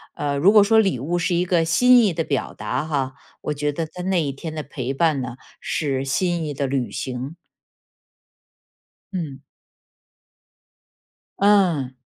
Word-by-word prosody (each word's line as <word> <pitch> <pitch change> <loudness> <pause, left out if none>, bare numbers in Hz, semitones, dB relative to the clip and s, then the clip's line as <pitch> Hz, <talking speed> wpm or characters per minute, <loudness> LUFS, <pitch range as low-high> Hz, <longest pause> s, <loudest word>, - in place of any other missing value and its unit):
呃， 145 -1 -2
如 180 +8 +5
果 210 -1 +7
说 220 +2 +4
礼 195 - +1
物 170 +6 -1
是 175 +1 0
一 175 +1 +1
个 175 -2 +2
心 245 +9 +5
意 205 - +3
的 165 0 -2
表 140 -4 -3
达 125 +6 -2
哈， 140 -4 -2 0.3
我 150 - -2
觉 145 0 -1
得 165 +3 -3
他 180 +3 -9
那 185 -1 +1
一 140 -2 -2
天 155 +4 -7
的 155 - -4
陪 135 -3 -5
伴 145 -1 +1
呢， 125 -1 -5 0.3
是 135 -4 -1
心 170 +5 0
意 150 - -3
的 140 0 -2
履 130 -2 -1
行。 130 +4 -5 1.8
嗯。 155 -7 -4 2.0
嗯。 180 -10 +3
155 Hz, 170 characters per minute, -22 LUFS, 135-175 Hz, 2.0 s, 果